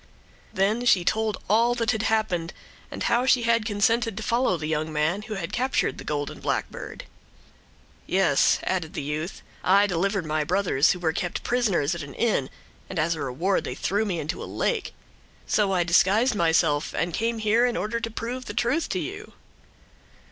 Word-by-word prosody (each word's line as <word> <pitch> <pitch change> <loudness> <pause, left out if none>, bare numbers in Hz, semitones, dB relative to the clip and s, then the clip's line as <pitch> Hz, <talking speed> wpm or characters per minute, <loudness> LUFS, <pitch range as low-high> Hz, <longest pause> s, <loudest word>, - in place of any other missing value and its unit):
Then 210 +5 +1
she 185 -7 +4
told 220 0 0
all 230 +4 +3
that 230 -2 +1
had 220 - -1
happened, 195 -7 0 0.4
and - - -5
how 245 +2 +2
she 250 -2 +4
had 230 -1 +2
consented 225 +1 +1
to 220 - -4
follow 230 -4 +1
the 155 - -5
young 155 0 -1
man 155 +6 0
who 215 0 -6
had 170 -3 -5
captured 260 +2 0
the - - -7
golden 145 -1 -3
blackbird. - - -4 1.0
"Yes," 185 -7 +3
added 175 -4 -2
the - - -3
youth, 150 +5 -4 0.2
"I 200 +2 +5
delivered 195 0 0
my 155 0 0
brothers, 175 -4 +2
who 180 - -8
were 160 -2 0
kept 175 +1 -3
prisoners 200 - +1
in 170 - -5
an 140 -2 -9
inn, 210 - +1 0.4
and 190 - -6
as 165 +2 +2
a 160 - -6
reward 160 +9 0
they - - -5
threw 205 +3 0
me 185 -6 -2
into 155 +4 -4
a - - -5
lake. 455 -5 -2 0.5
So 205 -2 +1
I 180 -2 +2
disguised 195 +8 +3
myself 160 -5 +1
and 170 0 -1
came 230 +4 -1
here 220 +3 +3
in 245 - -2
order 225 +2 -2
to 230 - -3
prove 240 +3 -5
the - - -7
truth 250 +7 0
to - - -1
you. - - -7
195 Hz, 185 wpm, -25 LUFS, 165-230 Hz, 1.0 s, I